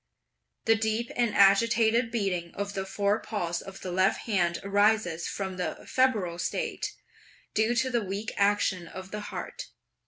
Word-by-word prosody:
The 225 - +6
deep 220 +1 -1
and 235 -4 +1
agitated 225 +4 +4
beating 190 -7 -2
of 200 0 -3
the 190 -1 -3
forepulse 200 -3 -1
of 195 0 -10
the 185 - -4
left 185 +2 +2
hand 175 -6 +1
arises 200 -4 +2
from 190 -2 -4
the 175 -4 -4
febrile 210 -10 +1
state, - - -2 0.6
due 220 +3 +2
to 260 +2 +1
the 240 -1 +1
weak 200 +2 -4
action 200 -3 +1
of 190 +2 -9
the 210 - -4
heart. - - -6
200 Hz, 150 wpm, -28 LUFS, 185-220 Hz, 0.6 s, The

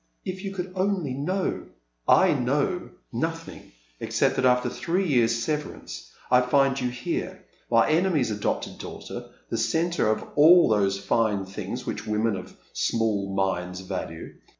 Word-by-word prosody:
If 185 +1 -5
you 195 - -3
could 185 -1 -5
only 185 -7 0
know 180 +8 -2
" - - -44
" - - -44 0.2
I - - +4
know - - 0 0.2
nothing - - -4 0.3
except - - +1
that 130 - +4
after 125 0 +3
three 180 +3 -1
years' 120 -6 +3
severance 150 - -5 0.2
I 125 - +6
find 135 +1 +2
you 125 - 0
here, 125 0 -4 0.2
my 115 -1 +4
enemy's 155 -7 +2
adopted 105 -1 -2
daughter, - - -8 0.2
the 115 - -1
centre 165 +5 +1
of 110 - 0
all 170 +4 +7
those 100 -2 +2
fine 105 -1 +1
things 100 +6 -6
which 105 +1 -5
women 105 0 +1
of 90 - -9 0.2
small 105 -4 0
minds 90 -1 -1
'value. 90 -3 -6
120 Hz, 150 wpm, -26 LUFS, 100-155 Hz, 0.3 s, all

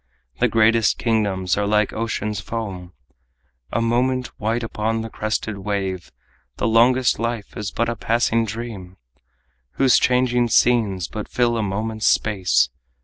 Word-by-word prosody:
The - - +4
greatest 115 -1 +3
kingdoms 100 -5 0
are 105 0 0
like 105 0 +1
ocean's 105 -2 -3
foam, 100 -5 -6 0.8
A 115 - 0
moment 125 +2 0
white 115 +3 -1
upon 115 0 -2
the 115 0 -7
crested 110 -1 -3
wave. 95 -4 -3 0.5
The - - 0
longest 120 +3 +3
life 115 -2 -3
is 105 -2 -4
but 115 +3 -1
a 115 - -2
passing 115 0 +1
dream, 110 -5 -7 0.8
Whose 135 -2 +4
changing 125 -1 +2
scenes 110 -6 +2
but 105 -1 -7
fill 120 -1 +1
a 115 - 0
moment's 110 +2 -2
space. 95 -12 +2
110 Hz, 140 wpm, -21 LUFS, 100-115 Hz, 0.8 s, The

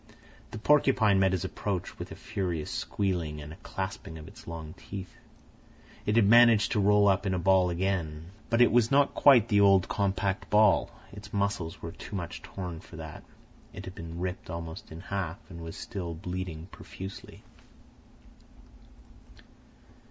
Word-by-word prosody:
The - - -7
porcupine 110 -5 +4
met 95 -1 +4
his 95 -1 -1
approach 95 -1 -4
with - - -7
a - - -6
furious 90 -7 -3
squealing 85 -7 -2
and 75 +1 -8
a - - -13
clashing 95 -4 -6
of 75 - -10
its - - -14
long 80 -2 -7
teeth. 95 -2 -8 0.9
It 105 - +2
had 115 -3 +5
managed 115 0 +6
to - - +1
roll 105 0 +5
up 95 0 +2
in 95 - +1
a - - 0
ball 95 0 +4
again, 85 -3 -2 0.2
but 115 +1 +3
it - - +4
was 120 -1 +4
not 140 0 +3
quite 125 -6 +6
the 105 -3 +4
old 100 -2 +5
compact 95 -1 -1
ball; 105 -1 +4 0.2
its - - -11
muscles 100 -5 -2
were - - -4
too - - -9
much - - -5
torn 90 -4 -6
for 85 - -14
that. 80 -2 -8 0.5
It - - -8
had 95 - -7
been 85 0 -8
ripped 90 +1 -4
almost 85 -2 -7
in 80 +1 -8
half, 95 -3 -3
and 85 -1 -8
was 80 0 -7
still 85 -4 -5
bleeding 90 -2 -5
profusely. 95 +1 -10
95 Hz, 165 wpm, -29 LUFS, 85-100 Hz, 0.9 s, managed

